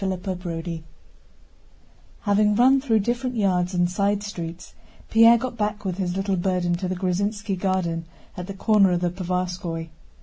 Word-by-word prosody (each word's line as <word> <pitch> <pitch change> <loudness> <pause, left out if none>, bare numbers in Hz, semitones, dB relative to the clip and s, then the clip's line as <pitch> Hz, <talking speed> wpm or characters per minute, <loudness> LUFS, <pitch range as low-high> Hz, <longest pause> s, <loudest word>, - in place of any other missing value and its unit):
CHAPTER 190 0 -2
XXXIV 170 -2 -5 1.4
Having 210 0 +3
run 260 +4 +5
through 225 -6 +2
different 245 +3 -2
yards 185 -4 +1
and 175 0 +3
side 200 +3 0
streets, 175 -4 -7 0.4
Pierre 230 +1 +7
got 240 0 -5
back 210 -1 -2
with 185 0 -3
his 180 -2 -1
little 195 -1 0
burden 180 -1 0
to 185 +1 -3
the 185 - -2
Gruzínski 195 +2 -1
garden 180 -3 -1 0.3
at 180 0 -6
the 195 - -6
corner 200 -2 +4
of 175 - 0
the 175 -1 0
Povarskóy. 180 -2 -3
190 Hz, 160 wpm, -24 LUFS, 180-210 Hz, 1.4 s, Pierre